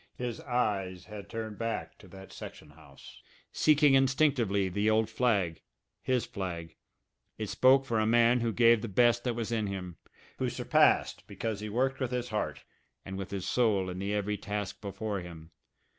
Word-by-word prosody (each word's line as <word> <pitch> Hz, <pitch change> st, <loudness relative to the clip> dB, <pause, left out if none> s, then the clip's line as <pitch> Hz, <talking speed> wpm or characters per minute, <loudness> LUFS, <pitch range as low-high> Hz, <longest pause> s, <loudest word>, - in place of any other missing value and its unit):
His 120 Hz, -2 st, -4 dB
eyes 95 Hz, -7 st, -1 dB
had 105 Hz, -1 st, -9 dB
turned 110 Hz, -2 st, -6 dB
back 115 Hz, -1 st, -4 dB
to -, -, -15 dB
that 95 Hz, 0 st, -12 dB
section 75 Hz, -, -10 dB
house, 70 Hz, -2 st, -15 dB, 0.3 s
seeking 150 Hz, -2 st, +4 dB
instinctively 135 Hz, -7 st, +3 dB
the 100 Hz, +4 st, 0 dB
old 110 Hz, 0 st, +2 dB
flag, 100 Hz, -10 st, +1 dB, 0.4 s
his 130 Hz, -2 st, 0 dB
flag. 85 Hz, -6 st, -6 dB, 0.6 s
It 110 Hz, -2 st, -4 dB
spoke 135 Hz, +1 st, +4 dB
for 115 Hz, -4 st, 0 dB
a 110 Hz, -, +1 dB
man 120 Hz, +2 st, +4 dB
who 115 Hz, -1 st, 0 dB
gave 115 Hz, 0 st, +5 dB
the 115 Hz, -, -4 dB
best 120 Hz, +3 st, +3 dB
that 120 Hz, -2 st, 0 dB
was 115 Hz, 0 st, -3 dB
in 110 Hz, -3 st, 0 dB
him, 90 Hz, -3 st, -6 dB, 0.4 s
who -, -, 0 dB
surpassed -, -, +2 dB
because 110 Hz, -2 st, -4 dB
he 105 Hz, 0 st, -5 dB
worked 130 Hz, +4 st, 0 dB
with 130 Hz, -3 st, -1 dB
his 125 Hz, 0 st, -3 dB
heart 105 Hz, -1 st, -3 dB, 0.4 s
and 95 Hz, -, -6 dB
with 95 Hz, -1 st, -5 dB
his 100 Hz, -2 st, -4 dB
soul 100 Hz, -6 st, +1 dB
in 90 Hz, -, -6 dB
the 100 Hz, +1 st, -2 dB
every 105 Hz, 0 st, -1 dB
task 105 Hz, 0 st, -5 dB
before 105 Hz, 0 st, -4 dB
him. 85 Hz, -2 st, -10 dB
110 Hz, 175 wpm, -30 LUFS, 95-120 Hz, 0.6 s, gave